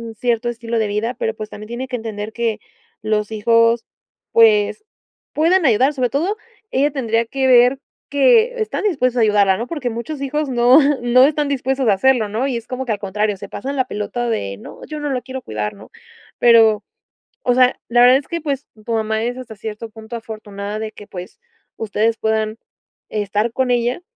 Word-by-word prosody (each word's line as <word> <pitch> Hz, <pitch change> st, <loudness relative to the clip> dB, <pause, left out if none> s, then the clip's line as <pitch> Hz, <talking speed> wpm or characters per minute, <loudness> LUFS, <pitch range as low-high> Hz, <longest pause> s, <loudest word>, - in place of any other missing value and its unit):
cierto 240 Hz, +1 st, 0 dB
estilo 230 Hz, -1 st, -3 dB
de 220 Hz, -, +1 dB
vida, 210 Hz, +4 st, -2 dB
pero 460 Hz, -2 st, -2 dB
pues 215 Hz, 0 st, -7 dB
también 215 Hz, 0 st, -9 dB
tiene 240 Hz, +3 st, -5 dB
que 250 Hz, -, -3 dB
entender 220 Hz, -1 st, -6 dB
que 230 Hz, -1 st, -1 dB, 0.4 s
los 215 Hz, 0 st, -1 dB
hijos, 230 Hz, +2 st, +3 dB, 0.5 s
pues 220 Hz, -, +4 dB, 0.5 s
puedan 330 Hz, +3 st, +3 dB
ayudar. 255 Hz, +5 st, +3 dB
Sobre 255 Hz, -3 st, 0 dB
todo, 350 Hz, -, -1 dB, 0.3 s
ella 280 Hz, +3 st, +2 dB
tendría 230 Hz, -4 st, 0 dB
que 265 Hz, +3 st, -2 dB
ver 250 Hz, +1 st, +6 dB, 0.3 s
que 460 Hz, -, +3 dB
están 435 Hz, -, -2 dB
dispuestos 255 Hz, -, +1 dB
a -, -, +4 dB
ayudarla, 205 Hz, -3 st, +4 dB
¿no?, 235 Hz, -, -4 dB
porque 290 Hz, -6 st, -3 dB
muchos 235 Hz, +6 st, -6 dB
hijos 285 Hz, +1 st, -2 dB
no 245 Hz, +3 st, +5 dB, 0.2 s
no 245 Hz, +1 st, +5 dB
están 295 Hz, 0 st, +1 dB
dispuestos 265 Hz, -2 st, -1 dB
a -, -, +5 dB
hacerlo, 235 Hz, +2 st, +2 dB
¿no?, 225 Hz, +5 st, -1 dB
y 255 Hz, -3 st, -1 dB
es 235 Hz, -, -9 dB
como 260 Hz, +1 st, -4 dB
que 240 Hz, -, -2 dB
al 205 Hz, -, -5 dB
contrario, 210 Hz, 0 st, -1 dB
se -, -, -8 dB
pasan 275 Hz, +1 st, -5 dB
la 260 Hz, -, +2 dB
pelota 240 Hz, +2 st, -3 dB
de: 100 Hz, -, -2 dB
"No, -, -, -12 dB
yo 305 Hz, -1 st, -6 dB
no 295 Hz, -, -3 dB
lo 255 Hz, -, -1 dB
quiero 260 Hz, 0 st, -6 dB
cuidar", 105 Hz, -1 st, -4 dB
¿no?, -, -, -15 dB, 0.5 s
pero, 225 Hz, -3 st, +5 dB, 0.6 s
o 245 Hz, -, +2 dB
sea, 255 Hz, 0 st, +4 dB
la 240 Hz, +1 st, +4 dB
verdad 250 Hz, +2 st, +7 dB
es 275 Hz, -, -10 dB
que 335 Hz, -, -3 dB
pues 285 Hz, -2 st, -3 dB, 0.2 s
tu 235 Hz, -, -2 dB
mamá 220 Hz, -1 st, 0 dB
es 245 Hz, +1 st, -2 dB
hasta 235 Hz, -4 st, -9 dB
cierto 220 Hz, +2 st, -7 dB
punto 220 Hz, +1 st, -10 dB
afortunada 215 Hz, -2 st, -6 dB
de 215 Hz, 0 st, -5 dB
que 205 Hz, -, -12 dB
pues 180 Hz, -, -9 dB, 0.4 s
ustedes 225 Hz, +1 st, 0 dB
puedan 220 Hz, 0 st, -1 dB, 0.5 s
estar 210 Hz, +2 st, -1 dB
con 260 Hz, +1 st, 0 dB
ella. 245 Hz, +6 st, 0 dB
235 Hz, 195 wpm, -19 LUFS, 215-265 Hz, 0.6 s, verdad